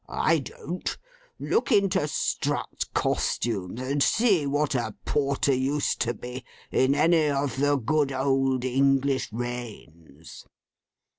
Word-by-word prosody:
I 160 0 +2
don't. 170 +6 -5 0.4
Look 445 - 0
into 195 -7 +3
Strutt's - - -2
Costumes, 105 -2 -1
and 140 +2 -1
see 195 - +3
what 145 +1 0
a 120 -5 -2
Porter 140 -1 +1
used 135 +3 0
to 120 0 0
be, 125 +3 -8 0.3
in 130 +2 +3
any 160 +1 +3
of 140 -2 -1
the 145 +1 +2
good 145 +2 +1
old 135 -1 +1
English 135 0 +1
reigns. 110 - -8
135 Hz, 120 wpm, -26 LUFS, 125-145 Hz, 0.4 s, into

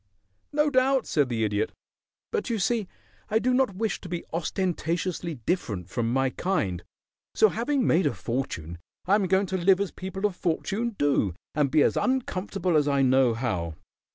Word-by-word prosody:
"No 300 0 +2
doubt," 260 -1 +3
said 145 -4 +1
the 115 -2 0
Idiot. 105 0 0 0.6
"But 445 - -1
you 230 - 0
see 215 0 0 0.4
I 215 - +3
do 250 +3 +1
not 255 -6 +2
wish 220 +2 -2
to 180 - -9
be 175 -1 -3
ostentatiously 170 0 -2
different 105 - -2
from 115 -2 -1
my 135 +1 +1
kind, 95 - -1 0.5
so 220 - +6
having 250 +5 0
made 170 -1 +3
a 140 - 0
fortune 85 - -4 0.3
I 190 - +2
am 205 -2 +3
going 190 +2 +3
to 190 0 -2
live 185 +1 +4
as 200 -2 -1
people 190 +2 -4
of 205 -3 0
fortune 205 +7 -1
do 135 -11 +1 0.2
and 150 -3 +2
be 150 +1 +4
as - - +2
uncomfortable 195 -8 0
as 150 -1 +2
I 140 -1 +3
know 130 -2 +4
how." 90 -10 -2
180 Hz, 180 wpm, -26 LUFS, 130-210 Hz, 0.6 s, so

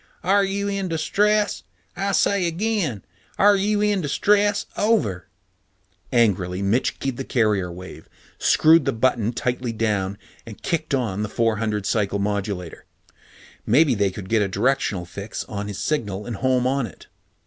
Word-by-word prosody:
"Are 200 +2 +3
you 200 +1 -1
in 200 -1 -2
distress? 205 +6 +1 0.3
I 195 +1 -1
say 200 -3 +2
again. 170 - -1 0.3
Are 205 +1 +6
you 205 +1 +1
in 205 -2 +2
distress? 205 +7 +2
Over." 205 - +1 0.8
Angrily 100 -6 +1
Mitch 110 +6 0
keyed 135 -3 -3
the 135 - -3
carrier 105 -9 +1
wave, 90 +2 -11 0.3
screwed 160 -2 +5
the - - +1
button 115 -1 +1
tightly 125 0 -2
down, 105 -3 -1 0.3
and 110 -3 -11
kicked 155 -3 -1
on 110 -6 -2
the 105 - -2
four 115 -1 +1
hundred 105 -2 -2
cycle 100 -2 0
modulator. 100 -3 -3 0.8
Maybe 140 +5 +4
they 100 -3 +1
could 95 0 -8
get 110 +1 +2
a 100 - +1
directional 100 -3 0
fix 100 +4 -6
on 100 -1 -5
his 105 - -6
signal 105 -9 -2
and 120 -4 -5
home 125 +3 +1
on 135 -1 0
it. 90 - -15
120 Hz, 155 wpm, -23 LUFS, -, 0.8 s, Are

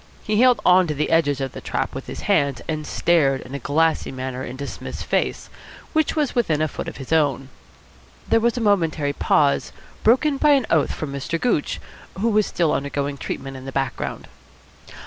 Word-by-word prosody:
He 215 +1 +1
held 250 -4 +5
on 180 0 +6
to 150 - -2
the 150 - -1
edges 145 -4 +2
of 135 -2 -3
the - - -9
trap - - -2
with - - -7
his - - -6
hands, 140 -4 +1
and 155 -1 -3
stared 140 -6 +2
in 130 - -11
a 140 - -3
glassy 160 +5 +1
manner 130 0 -5
into 130 +3 -6
Psmith's - - -7
face, - - -1 0.5
which 315 -1 +1
was 300 -4 0
within 190 - +1
a 155 - +2
foot - - -6
of - - -7
his 135 +3 -4
own. 140 -4 +1 0.8
There 225 - +4
was 235 +1 +1
a - - -1
momentary 165 -9 +1
pause, 145 0 +2 0.3
broken 275 +6 +3
by 295 +1 +5
an 270 -4 +3
oath 155 -3 +3
from 145 -3 -5
Mr. 140 +4 -3
Gooch, 215 -10 0 0.4
who 230 +4 +2
was 215 -1 +2
still 170 -3 +1
undergoing 140 0 -2
treatment 135 +1 -5
in 130 0 -9
the 135 - -5
background. 135 0 -3
155 Hz, 195 wpm, -22 LUFS, 140-210 Hz, 0.8 s, on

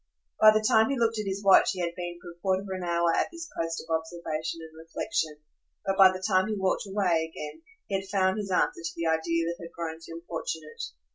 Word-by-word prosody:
By 215 - +9
the 215 0 +3
time 220 +2 +5
he 275 - 0
looked 225 -2 +1
at 210 - -3
his 195 +1 -3
watch 195 +1 +6
he 185 - -7
had 170 -1 -1
been 175 -1 -5
for 175 0 -10
a 170 - -18
quarter 190 0 +1
of 200 - -9
an 185 -1 -3
hour 170 -1 +2
at - - +2
this 335 -1 -7
post 165 0 -2
of 165 - +2
observation 160 0 -4
and 160 0 -12
reflexion; 160 - -3 0.5
but 195 0 +1
by 190 -1 +8
the 185 0 -5
time 190 -1 +3
he 215 - -1
walked 190 +1 0
away 175 -5 +1
again 150 - -7 0.2
he 195 - -1
had 195 - -10
found 190 +1 +2
his 200 -2 -4
answer 180 -2 +1
to 165 - -3
the 170 - -3
idea 165 +1 +1
that 170 +1 -2
had 170 - -8
grown 165 -1 -5
so 165 - -10
importunate. 165 -2 -5
175 Hz, 240 wpm, -28 LUFS, 165-195 Hz, 0.5 s, By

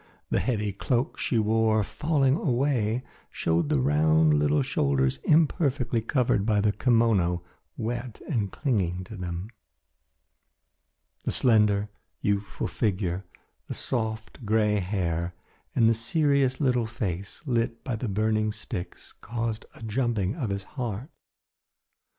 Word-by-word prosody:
The - - +3
heavy 105 -5 0
cloak 125 - -1
she 125 - 0
wore, 110 0 +3
falling 135 +5 +1
away, 125 -5 +1 0.3
showed 80 -2 0
the - - +3
round 75 +3 +4
little 75 -1 +3
shoulders 65 -1 +1
imperfectly 140 -6 +2
covered 115 -3 +1
by 105 -1 +2
the 105 0 +3
kimono, 105 -8 +2 0.3
wet 120 +1 -4
and 105 - -1
clinging 95 - 0
to 110 - -9
them. 90 +2 -5 1.7
The - - -1
slender, 105 -4 +3 0.3
youthful 100 0 -1
figure, 95 -3 -1 0.4
the - - -5
soft 110 -1 -4
grey 105 -1 +2
hair 90 -3 -2 0.4
and 115 - +5
the 115 - +5
serious 135 +2 +1
little 125 -5 +2
face, 100 - -4
lit 115 -3 -1
by 125 - -2
the 110 +1 -3
burning 110 +1 +1
sticks 105 -4 -7
caused 115 -1 -4
a - - -12
jumping 110 -3 0
of 130 -10 -3
his 100 0 -2
heart. 120 - -5
110 Hz, 125 wpm, -27 LUFS, 95-120 Hz, 1.7 s, and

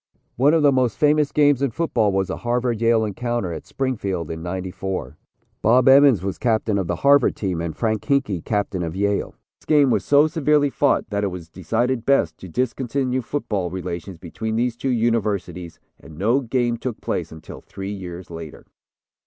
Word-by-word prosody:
One 140 +6 +4
of 160 - +2
the 145 - +6
most 130 -4 +1
famous 150 -1 +3
games 145 -3 +3
in 140 - +2
football 115 -6 0
was 95 -1 0
the - - -3
Harvard 120 -1 -1
Yale 115 -1 +3
encounter 115 -3 -3
at - - -8
Springfield 100 - -3
in 80 0 -6
'94. 90 -4 -5 0.5
Bob 125 +4 +4
Emmons 135 - +6
was 95 -1 -4
captain 110 -3 +1
of 95 - -2
the 90 - -1
Harvard 140 -2 +5
team 90 -5 -2
and 85 -2 -4
Frank 110 -3 -1
Hinkey 135 - 0
captain 100 -3 -2
of 85 -1 -4
Yale. 100 +1 -1 0.2
This - - -26
game 145 -4 +4
was - - +1
so 145 +1 +5
severely 150 -2 +2
fought 140 0 +1
that 100 0 -1
it - - +1
was 90 -3 -7
decided 115 +8 -1
best 100 -12 +1
to 95 - -10
discontinue 130 - -1
football 105 -8 -3
relations 90 0 -6
between 110 +6 -5
these 120 +1 0
two 135 - -3
universities 105 -7 -1 0.2
and 80 -1 -14
no 115 +9 +2
game 120 -2 -1
took 120 -1 -5
place - - -3
until 80 -1 -11
three 95 +2 -7
years 90 -2 -8
later. 80 -2 -9
110 Hz, 185 wpm, -22 LUFS, 95-130 Hz, 0.5 s, the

